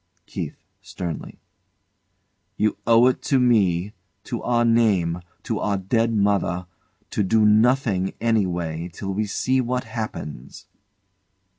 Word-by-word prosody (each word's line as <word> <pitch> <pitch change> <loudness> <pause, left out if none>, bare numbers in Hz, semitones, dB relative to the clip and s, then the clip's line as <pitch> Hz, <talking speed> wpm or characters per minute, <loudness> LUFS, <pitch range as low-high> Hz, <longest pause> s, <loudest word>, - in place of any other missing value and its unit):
KEITH. - - -5 0.3
[sternly] 85 -4 -6 1.2
You 110 - +1
owe 115 +1 +6
it 130 - +2
to 135 - +2
me 105 -6 +2 0.3
to 120 - -5
our 120 -1 +1
name 100 -7 +2 0.2
to - - -2
our 100 0 0
dead 115 +5 +1
mother 100 -4 +1 0.5
to - - 0
do 110 +2 +3
nothing 110 -3 +3
anyway 90 -7 -1
till 95 +2 -5
we 105 +2 -1
see 130 +6 +1
what 125 +1 -2
happens. 110 - -7
105 Hz, 120 wpm, -23 LUFS, 90-115 Hz, 1.2 s, owe